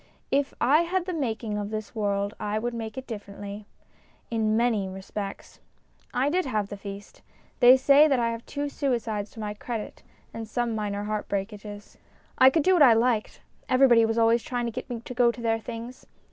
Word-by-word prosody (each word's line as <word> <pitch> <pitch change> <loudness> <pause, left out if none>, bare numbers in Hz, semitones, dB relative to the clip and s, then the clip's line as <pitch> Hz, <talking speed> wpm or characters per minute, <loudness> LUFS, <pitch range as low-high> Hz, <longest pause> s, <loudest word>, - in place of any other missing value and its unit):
If 280 0 +1
I 285 +7 +4
had 350 +1 -1
the 365 - -3
making 225 -8 -2
of 205 0 -4
this 215 -1 -5
world 200 -1 -1
I 210 0 -2
would 240 +2 -2
make 225 +1 -6
it 260 - -5
differently 205 -2 -8 0.6
in 220 -1 +1
many 225 -5 +1
respects. 195 +1 -7 0.5
I 255 +3 +1
did 360 +4 +1
have 210 -5 -1
the 205 - -5
feast; 200 0 -10 0.4
they 250 +1 +8
say 280 +3 +6
that 275 -3 +2
I 230 -1 +1
have 230 0 -6
two 290 0 -3
suicides 230 -7 -2
to - - -11
my 210 -1 -3
credit 220 +1 -6 0.3
and 225 -1 -6
some 240 +1 -1
minor 205 -1 -3
heart 210 0 -3
breakages. 205 +1 -6 0.4
I 260 - +9
could 315 +2 +1
do 375 - +4
what 350 - +3
I 255 -5 +8
liked; 225 -1 0 0.3
everybody 255 -3 +5
was 225 0 0
always 230 +1 +4
trying 245 0 -3
to 235 - -2
get - - -7
me 235 -2 -5
to 250 - -8
go 245 -1 +4
to 240 - -12
their 225 -1 0
things. 235 +2 -8
230 Hz, 200 wpm, -26 LUFS, 210-255 Hz, 0.6 s, I